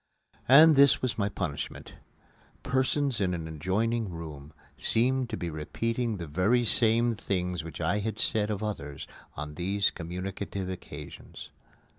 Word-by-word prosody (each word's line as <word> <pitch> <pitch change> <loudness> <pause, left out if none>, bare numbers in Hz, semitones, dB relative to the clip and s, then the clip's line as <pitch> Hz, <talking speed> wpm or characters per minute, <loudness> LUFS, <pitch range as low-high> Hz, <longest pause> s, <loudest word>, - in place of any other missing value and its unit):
And 155 +4 +8
this 140 0 +5
was 125 -3 -1
my 100 0 +1
punishment: 80 -8 -5 0.7
persons 130 -1 0
in 90 -2 +1
an 80 -2 -5
adjoining 100 +8 -1
room 80 -4 -8 0.2
seemed 125 +2 +2
to 110 - -3
be 85 -2 -4
repeating 115 +9 -2
the 85 - -5
very 95 +11 +2
same 115 +1 +3
things 90 -5 -2
which 80 -1 -8
I 85 +5 +1
had 110 0 -3
said 105 -1 +1
of 105 0 -3
others 75 -10 -5 0.3
on 75 +1 -6
these 95 +4 +1
communicative 95 +2 -5
occasions. 95 - -9
100 Hz, 140 wpm, -28 LUFS, 85-115 Hz, 0.7 s, And